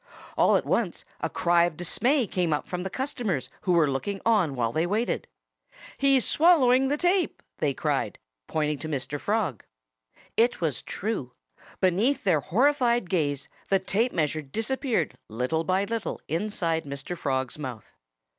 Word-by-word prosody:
All -, -, +4 dB
at -, -, +1 dB
once -, -, 0 dB, 0.2 s
a -, -, -2 dB
cry 175 Hz, -1 st, +3 dB
of 165 Hz, -3 st, -4 dB
dismay 245 Hz, -, +2 dB
came 175 Hz, -5 st, 0 dB
from 180 Hz, -1 st, -4 dB
the 190 Hz, -, -3 dB
customers 230 Hz, -, -2 dB
who 180 Hz, -, +1 dB
were 165 Hz, -3 st, +4 dB
looking 195 Hz, +9 st, -2 dB
on 200 Hz, -11 st, +3 dB
while 115 Hz, -2 st, 0 dB
they 160 Hz, +6 st, 0 dB
waited. 215 Hz, +6 st, -1 dB, 0.7 s
"He's 270 Hz, -3 st, +3 dB
swallowing 270 Hz, -6 st, +5 dB
the 290 Hz, +2 st, 0 dB
tape!" 355 Hz, +1 st, +1 dB, 0.2 s
they 140 Hz, -3 st, 0 dB
cried, -, -, -1 dB, 0.3 s
pointing 150 Hz, -2 st, -1 dB
to 160 Hz, -, -5 dB
Mr. 140 Hz, 0 st, -3 dB
Frog. 200 Hz, -, -1 dB, 0.7 s
It 235 Hz, +2 st, +3 dB
was 160 Hz, -6 st, -1 dB
true. 195 Hz, -, -4 dB, 0.5 s
Beneath 210 Hz, +10 st, +2 dB
their 180 Hz, -7 st, +3 dB
horrified 240 Hz, -, +2 dB
gaze 145 Hz, -6 st, 0 dB, 0.2 s
the 195 Hz, -, +5 dB
tape 205 Hz, +6 st, 0 dB
measure 155 Hz, 0 st, 0 dB
disappeared 225 Hz, -, -1 dB
little 125 Hz, +9 st, -1 dB
by 185 Hz, +4 st, +1 dB
little 225 Hz, +1 st, -3 dB
inside 165 Hz, -2 st, -1 dB
Mr. 140 Hz, +5 st, -5 dB
Frog's 130 Hz, -3 st, -2 dB
mouth. 125 Hz, -7 st, -7 dB
180 Hz, 150 wpm, -27 LUFS, 150-235 Hz, 0.7 s, swallowing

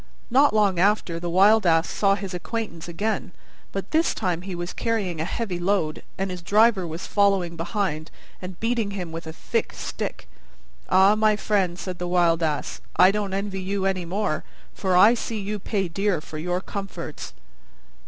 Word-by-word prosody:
Not 275 Hz, +4 st, +5 dB
long 200 Hz, -4 st, +3 dB
after 185 Hz, -3 st, +2 dB
the 175 Hz, 0 st, -4 dB
Wild 200 Hz, +5 st, +5 dB
Ass 165 Hz, 0 st, +4 dB
saw 195 Hz, -1 st, +2 dB
his 195 Hz, -1 st, -6 dB
acquaintance 180 Hz, -2 st, -4 dB
again, 200 Hz, +2 st, -2 dB, 0.4 s
but 195 Hz, 0 st, -5 dB
this 320 Hz, +2 st, +2 dB
time 175 Hz, -2 st, -1 dB
he 185 Hz, -1 st, -6 dB
was 175 Hz, 0 st, -5 dB
carrying 200 Hz, -8 st, -1 dB
a -, -, -1 dB
heavy 190 Hz, -2 st, -3 dB
load, 175 Hz, -4 st, 0 dB, 0.2 s
and 195 Hz, 0 st, -2 dB
his 180 Hz, -1 st, -6 dB
driver 205 Hz, 0 st, +3 dB
was 165 Hz, +2 st, -6 dB
following 195 Hz, -4 st, +2 dB
behind 165 Hz, -3 st, -2 dB, 0.3 s
and 180 Hz, -1 st, -8 dB
beating 225 Hz, -2 st, 0 dB
him 175 Hz, -3 st, -5 dB
with 165 Hz, 0 st, -7 dB
a -, -, -4 dB
thick -, -, -2 dB
stick. -, -, -5 dB, 0.6 s
"Ah, 195 Hz, +2 st, +6 dB
my 215 Hz, 0 st, +3 dB
friend," 195 Hz, -5 st, 0 dB
said 185 Hz, -2 st, -6 dB
the 175 Hz, -, -3 dB
Wild 175 Hz, -2 st, +3 dB
Ass, 155 Hz, -3 st, -2 dB
"I 185 Hz, +1 st, +7 dB
don't 200 Hz, -2 st, -2 dB
envy 195 Hz, -1 st, -3 dB
you 195 Hz, +1 st, -2 dB
any 190 Hz, -2 st, 0 dB
more: 180 Hz, -3 st, -1 dB, 0.3 s
for 185 Hz, -2 st, +1 dB
I 210 Hz, +5 st, +8 dB
see 230 Hz, -2 st, -3 dB
you 205 Hz, +1 st, -3 dB
pay 195 Hz, -1 st, -1 dB
dear 195 Hz, +1 st, 0 dB
for 155 Hz, 0 st, -8 dB
your 180 Hz, +3 st, -1 dB
comforts." 195 Hz, -, -6 dB
190 Hz, 180 wpm, -24 LUFS, 175-205 Hz, 0.6 s, I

